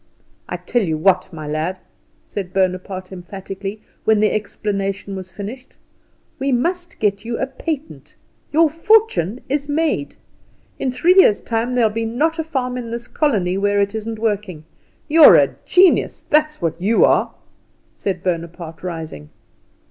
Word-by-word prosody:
"I -, -, -3 dB
tell 240 Hz, -, 0 dB
you 160 Hz, -6 st, -1 dB
what, 185 Hz, +3 st, +2 dB
my 155 Hz, -3 st, -7 dB
lad," 155 Hz, +5 st, -2 dB, 0.5 s
said 185 Hz, -3 st, -6 dB
Bonaparte 185 Hz, 0 st, -1 dB
emphatically, 195 Hz, +2 st, -7 dB, 0.2 s
when 220 Hz, -1 st, +3 dB
the 215 Hz, 0 st, +3 dB
explanation 200 Hz, -2 st, -3 dB
was 185 Hz, -1 st, -8 dB
finished, 215 Hz, +7 st, -8 dB, 0.6 s
"we 270 Hz, +1 st, 0 dB
must 345 Hz, +8 st, -1 dB
get 200 Hz, -1 st, 0 dB
you 235 Hz, 0 st, -3 dB
a -, -, 0 dB
patent. 295 Hz, +3 st, -6 dB, 0.4 s
Your 325 Hz, +2 st, +5 dB
fortune 330 Hz, -, +2 dB
is 285 Hz, +1 st, -2 dB
made. 290 Hz, -, 0 dB, 0.6 s
In 260 Hz, -, -1 dB
three 330 Hz, +8 st, +3 dB
years' 295 Hz, -, +6 dB
time 235 Hz, +2 st, -1 dB
there'll 230 Hz, -3 st, +3 dB
not 240 Hz, +9 st, 0 dB
be -, -, 0 dB
a -, -, -4 dB
farm 250 Hz, -5 st, -2 dB
in 235 Hz, -2 st, -6 dB
this 235 Hz, +1 st, -5 dB
colony 195 Hz, -, 0 dB
where 205 Hz, 0 st, +2 dB
it 200 Hz, +1 st, +1 dB
isn't 220 Hz, +1 st, -4 dB
working. 205 Hz, -7 st, -2 dB, 0.4 s
You're 320 Hz, +1 st, +8 dB
a -, -, +4 dB
genius, 365 Hz, 0 st, +4 dB
that's 305 Hz, -, +2 dB
what 165 Hz, +1 st, -2 dB
you 220 Hz, +5 st, +4 dB
are!" -, -, +2 dB, 0.6 s
said 185 Hz, -3 st, -3 dB
Bonaparte, 170 Hz, -2 st, -4 dB
rising. 160 Hz, -, -6 dB
210 Hz, 150 wpm, -20 LUFS, 185-265 Hz, 0.6 s, You're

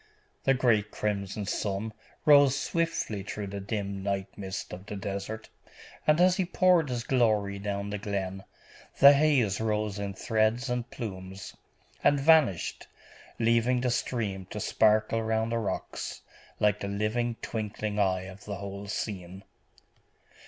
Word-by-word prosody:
The 135 Hz, -, +4 dB
great 115 Hz, -5 st, +2 dB
crimson 100 Hz, -1 st, -3 dB
sun 105 Hz, +1 st, -2 dB, 0.3 s
rose 140 Hz, -2 st, +6 dB
swiftly 165 Hz, -, -1 dB
through 105 Hz, +1 st, -5 dB
the 100 Hz, 0 st, -5 dB
dim 100 Hz, -1 st, -3 dB
night 100 Hz, -1 st, -3 dB
mist 95 Hz, -1 st, -6 dB
of 95 Hz, +3 st, -9 dB
the 105 Hz, -, -5 dB
desert, 100 Hz, +3 st, -5 dB, 0.6 s
and 155 Hz, +1 st, +5 dB
as 180 Hz, 0 st, +5 dB
he 190 Hz, -, +2 dB
poured 175 Hz, -3 st, +3 dB
his 120 Hz, -2 st, -2 dB
glory 110 Hz, -6 st, +1 dB
down 100 Hz, 0 st, -3 dB
the 105 Hz, -, -3 dB
glen, 95 Hz, -1 st, -3 dB, 0.6 s
the 140 Hz, +1 st, +10 dB
haze 140 Hz, -9 st, +2 dB
rose 105 Hz, -2 st, -1 dB
in 100 Hz, -1 st, -4 dB
threads 115 Hz, +4 st, +1 dB
and 120 Hz, -1 st, -2 dB
plumes, 95 Hz, -4 st, -7 dB, 0.5 s
and 145 Hz, -, +4 dB
vanished, 140 Hz, -, +3 dB, 0.5 s
leaving 115 Hz, +2 st, +2 dB
the 125 Hz, -1 st, +1 dB
stream 100 Hz, -7 st, -2 dB
to 105 Hz, -, -6 dB
sparkle 110 Hz, +1 st, +2 dB
round 110 Hz, +1 st, 0 dB
the 115 Hz, -, +1 dB
rocks, 110 Hz, -, -4 dB, 0.4 s
like 105 Hz, 0 st, +3 dB
the 100 Hz, -, -4 dB
living, 110 Hz, +4 st, -1 dB
twinkling 105 Hz, -1 st, -3 dB
eye 95 Hz, -2 st, +2 dB
of 95 Hz, +1 st, -11 dB
the 100 Hz, -, -4 dB
whole 100 Hz, +1 st, -7 dB
scene. 95 Hz, -2 st, -5 dB
105 Hz, 145 wpm, -29 LUFS, 100-120 Hz, 0.6 s, the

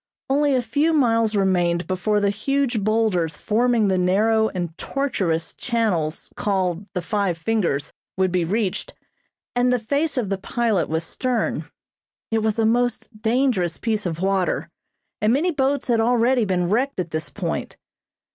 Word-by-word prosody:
Only 285 Hz, 0 st, +3 dB
a 250 Hz, -, +1 dB
few 290 Hz, +8 st, +1 dB
miles 230 Hz, -6 st, +2 dB
remained 180 Hz, -3 st, +2 dB
before 190 Hz, +3 st, 0 dB
the 200 Hz, -1 st, +2 dB
huge 250 Hz, +1 st, 0 dB
boulders 200 Hz, -8 st, +1 dB
forming 230 Hz, 0 st, +2 dB
the 190 Hz, -1 st, +2 dB
narrow 220 Hz, +5 st, +3 dB
and 175 Hz, -3 st, -4 dB
tortuous 190 Hz, -14 st, -2 dB
channels 195 Hz, -10 st, -1 dB
called 190 Hz, -2 st, -1 dB
the 180 Hz, -, -1 dB
"Five 200 Hz, -3 st, 0 dB
Fingers" 165 Hz, -6 st, -1 dB, 0.2 s
would 185 Hz, -1 st, +2 dB
be 180 Hz, -1 st, +1 dB
reached, 195 Hz, +2 st, -2 dB, 0.6 s
and 245 Hz, +1 st, +3 dB
the 250 Hz, -, +3 dB
face 280 Hz, +6 st, -1 dB
of 225 Hz, -6 st, 0 dB
the 195 Hz, -1 st, -1 dB
pilot 220 Hz, -2 st, 0 dB
was 160 Hz, +1 st, -1 dB
stern. 245 Hz, +5 st, -2 dB, 0.6 s
It 225 Hz, -, +2 dB
was 220 Hz, 0 st, 0 dB
a 225 Hz, -, +2 dB
most 235 Hz, -1 st, 0 dB
dangerous 225 Hz, -8 st, +1 dB
piece 215 Hz, -4 st, -1 dB
of 165 Hz, 0 st, -4 dB
water 190 Hz, -1 st, 0 dB, 0.5 s
and 215 Hz, -, +3 dB
many 310 Hz, +8 st, +2 dB
boats 280 Hz, -2 st, 0 dB
had 235 Hz, -2 st, +2 dB
already 240 Hz, +1 st, +3 dB
been 180 Hz, -3 st, 0 dB
wrecked 260 Hz, +2 st, 0 dB
at 175 Hz, -3 st, -3 dB
this 155 Hz, -1 st, -3 dB
point. -, -, -4 dB
215 Hz, 155 wpm, -22 LUFS, 185-245 Hz, 0.6 s, Only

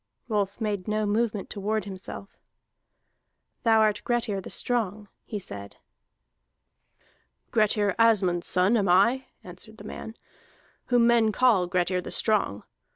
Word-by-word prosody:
Rolf 205 Hz, -3 st, -1 dB
made 205 Hz, -4 st, -2 dB
no 215 Hz, 0 st, 0 dB
movement 210 Hz, -1 st, -1 dB
to 205 Hz, -, -6 dB
ward 210 Hz, 0 st, -1 dB
himself. 195 Hz, 0 st, -9 dB, 1.2 s
"Thou 225 Hz, -1 st, +4 dB
art 210 Hz, -1 st, +2 dB
Grettir 235 Hz, -5 st, -1 dB
the -, -, -9 dB
Strong," 215 Hz, -4 st, -2 dB, 0.2 s
he 215 Hz, -, -5 dB
said. 100 Hz, -, -8 dB, 1.8 s
"Grettir 210 Hz, -2 st, +2 dB
Asmund's 195 Hz, -7 st, +3 dB
son 185 Hz, +6 st, +3 dB
am 200 Hz, -4 st, +1 dB
I," 235 Hz, +9 st, +3 dB, 0.2 s
answered 185 Hz, +5 st, -11 dB
the 205 Hz, -, -11 dB
man, 220 Hz, +1 st, -8 dB, 0.7 s
"whom 245 Hz, -2 st, +3 dB
men 235 Hz, -2 st, +4 dB
call 215 Hz, -6 st, +3 dB
Grettir 180 Hz, +1 st, 0 dB
the -, -, -8 dB
Strong. 200 Hz, -, 0 dB
210 Hz, 130 wpm, -26 LUFS, 190-225 Hz, 1.8 s, Thou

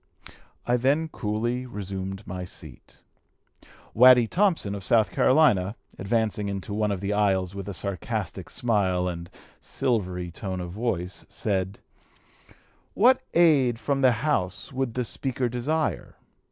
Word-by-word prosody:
I 120 Hz, 0 st, +2 dB
then 145 Hz, +6 st, +1 dB
coolly 120 Hz, +2 st, -2 dB
resumed 95 Hz, -2 st, -6 dB
my 90 Hz, 0 st, -5 dB
seat. 90 Hz, -, -11 dB, 0.9 s
Waddy 125 Hz, 0 st, +7 dB
Thompson, 170 Hz, -, +1 dB
of 100 Hz, -1 st, -6 dB
South 110 Hz, -2 st, +3 dB
Carolina, 110 Hz, -9 st, +3 dB, 0.2 s
advancing 105 Hz, 0 st, 0 dB
into 100 Hz, +1 st, -5 dB
one 105 Hz, 0 st, 0 dB
of 95 Hz, -2 st, -3 dB
the 100 Hz, +1 st, -1 dB
aisles 95 Hz, -3 st, +1 dB
with 100 Hz, 0 st, -6 dB
a -, -, -4 dB
sarcastic 100 Hz, -1 st, -4 dB
smile 95 Hz, -6 st, 0 dB
and 85 Hz, -1 st, -5 dB, 0.3 s
silvery 90 Hz, -7 st, -2 dB
tone 95 Hz, +2 st, -5 dB
of 90 Hz, -1 st, -5 dB
voice, 95 Hz, -4 st, -3 dB
said, 95 Hz, -1 st, -2 dB, 1.1 s
'What 255 Hz, +5 st, +5 dB
aid 145 Hz, -8 st, +4 dB
from 135 Hz, +3 st, -1 dB
the 125 Hz, -2 st, +3 dB
House 95 Hz, -5 st, -1 dB
would 130 Hz, -3 st, -2 dB
the 125 Hz, -1 st, -1 dB
Speaker 130 Hz, +1 st, -2 dB
desire?' 140 Hz, +7 st, -2 dB
105 Hz, 130 wpm, -26 LUFS, 95-125 Hz, 1.1 s, Waddy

